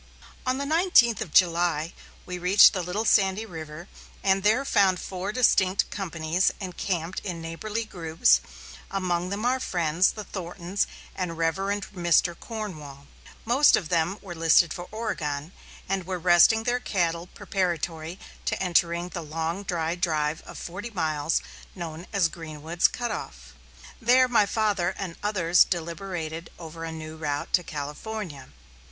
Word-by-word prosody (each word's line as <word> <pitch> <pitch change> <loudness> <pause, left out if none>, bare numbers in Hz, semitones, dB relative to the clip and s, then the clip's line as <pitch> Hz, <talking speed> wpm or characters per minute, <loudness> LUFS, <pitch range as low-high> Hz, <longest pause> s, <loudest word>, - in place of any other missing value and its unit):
On 255 +1 +1
the 280 - -2
nineteenth 310 - +4
of 160 - -4
July 170 -2 +3 0.3
we 180 0 -5
reached 185 +5 +7
the 185 - -1
Little 180 +6 -2
Sandy 200 0 +3
River 160 -2 -8 0.4
and 195 0 +3
there 220 +7 +3
found 190 -7 +3
four 190 +2 -4
distinct 195 -5 +3
companies 170 -2 0
encamped 180 -2 -3
in 175 -4 -5
neighborly 205 +8 -4
groups, 160 - +2 0.5
among 180 -2 -1
them 205 +4 -3
our 255 +1 +2
friends, 175 -4 +1
the 210 - -6
Thorntons 180 0 -3 0.3
and 180 -3 -3
Rev. 165 0 +1 0.4
Mr. 175 -1 +2
Cornwall. 155 - -7 0.4
Most 260 +6 +5
of 170 - -3
them 175 +2 +1
were 185 -3 -7
listed 165 0 +4
for 175 0 -7
Oregon, 170 -9 -3 0.4
and 190 -2 -2
were 185 -1 -2
resting 180 +6 +5
their 245 +1 +1
cattle 170 -6 -1
preparatory 170 -3 -3 0.3
to - - -1
entering 170 -1 +1
upon 180 - -10
the 150 - -13
long, 165 +4 -2
dry 170 -4 -1
drive 160 -3 -1
of - - -9
forty 200 +7 -6
miles, 160 -6 0 0.3
known 170 -1 -7
as 195 -6 +3
"Greenwood's 160 +1 -1
Cut 240 -1 -4
off." - - -7 0.5
There 255 +3 +5
my 235 -4 +3
father 200 -5 0
and 185 -4 -5
others 185 -4 +4
deliberated 170 -1 -4
over 165 -1 -8
a 165 - -5
new 160 0 -8
route 145 -2 -3
to 180 - +5
California. 150 0 -6
175 Hz, 145 wpm, -26 LUFS, 165-200 Hz, 0.5 s, reached